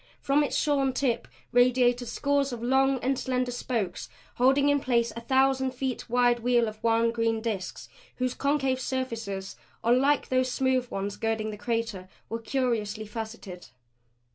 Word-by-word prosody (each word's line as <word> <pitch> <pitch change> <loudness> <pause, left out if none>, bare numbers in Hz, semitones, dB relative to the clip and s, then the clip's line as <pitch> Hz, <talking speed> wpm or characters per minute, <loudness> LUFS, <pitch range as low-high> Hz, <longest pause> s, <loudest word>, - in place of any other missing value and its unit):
From 285 +2 +2
its 290 - -2
shorn 275 -3 +1
tip 250 -3 0 0.2
radiated 245 0 +3
scores 280 0 0
of 235 -1 -6
long 265 +2 +3
and 265 +1 +1
slender 255 -1 -1
spokes 230 -7 -3 0.3
holding 270 +3 +4
in 285 0 +3
place 235 -4 +1
a 230 - -6
thousand 265 +1 +2
feet 255 -1 -3
wide 245 0 +3
wheel 240 -1 +2
of 215 0 -8
wan 230 0 +3
green 230 -1 0
disks 215 -5 -4 0.3
whose 255 -1 -1
concave 275 -2 0
surfaces, 230 -7 -4 0.3
unlike 260 +5 +3
those 255 0 +2
smooth 260 -1 +1
ones 200 +1 -4
girding 220 -1 -1
the - - -6
crater, 220 -4 -3 0.2
were 230 - -3
curiously 225 -4 -1
faceted. 215 -4 -7
245 Hz, 150 wpm, -27 LUFS, 225-265 Hz, 0.3 s, holding